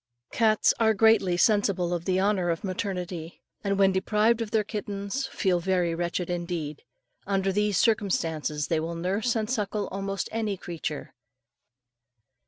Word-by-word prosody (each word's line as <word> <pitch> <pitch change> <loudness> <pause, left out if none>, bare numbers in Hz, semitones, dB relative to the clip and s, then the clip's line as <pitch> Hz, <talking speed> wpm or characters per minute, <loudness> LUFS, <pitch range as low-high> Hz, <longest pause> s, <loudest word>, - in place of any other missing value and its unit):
Cats 220 -2 +3
are 220 -1 +4
greatly 195 -4 +4
sensible 195 -4 +2
of 170 -1 -3
the 185 0 +1
honour 190 -3 +1
of 165 +5 -1
maternity, 180 -4 -4 0.2
and 200 -1 0
when 195 -1 +5
deprived 210 +4 +2
of 225 - -3
their 220 -1 +2
kittens 205 +4 -4
feel 185 -4 0
very 180 -1 +1
wretched 175 +1 -2
indeed. 170 -4 -4 0.5
Under 195 -1 +1
these 210 0 +1
circumstances, 165 -9 +1
they 165 - +1
will 165 +2 -3
nurse 195 +8 0
and 220 -1 0
suckle 210 -3 -1
almost 195 0 -3
any 215 -3 -2
creature. 165 -4 -5
195 Hz, 145 wpm, -27 LUFS, 175-210 Hz, 0.5 s, when